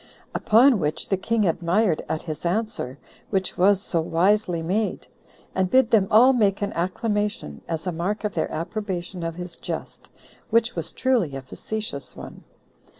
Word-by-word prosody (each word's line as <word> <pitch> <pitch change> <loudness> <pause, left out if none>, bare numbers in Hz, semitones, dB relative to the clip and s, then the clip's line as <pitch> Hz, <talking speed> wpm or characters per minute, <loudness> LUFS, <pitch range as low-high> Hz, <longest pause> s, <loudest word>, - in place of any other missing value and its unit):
Upon 235 +2 +5
which 155 -2 -2
the 195 - +3
king 215 +3 0
admired 170 +2 +1
at 160 - -2
his 155 -3 -6
answer, 180 - -2 0.3
which 190 -2 -1
was 195 +2 +4
so 165 - 0
wisely 175 +1 +1
made; 205 +6 -1 0.5
and 185 -1 +1
bid 255 0 +4
them 210 -4 +4
all 245 +5 +7
make 205 -5 +2
an 200 - -2
acclamation, 205 - -2
as 165 0 -3
a 180 - 0
mark 180 +7 -2
of 210 - -1
their - - -1
approbation 180 +1 -4
of 165 -1 -3
his 180 -1 -7
jest, - - -6 0.4
which 230 +1 +2
was - - -1
truly 230 - +1
a 135 - -6
facetious 210 +2 -6
one. - - -10
190 Hz, 160 wpm, -24 LUFS, 170-215 Hz, 0.5 s, all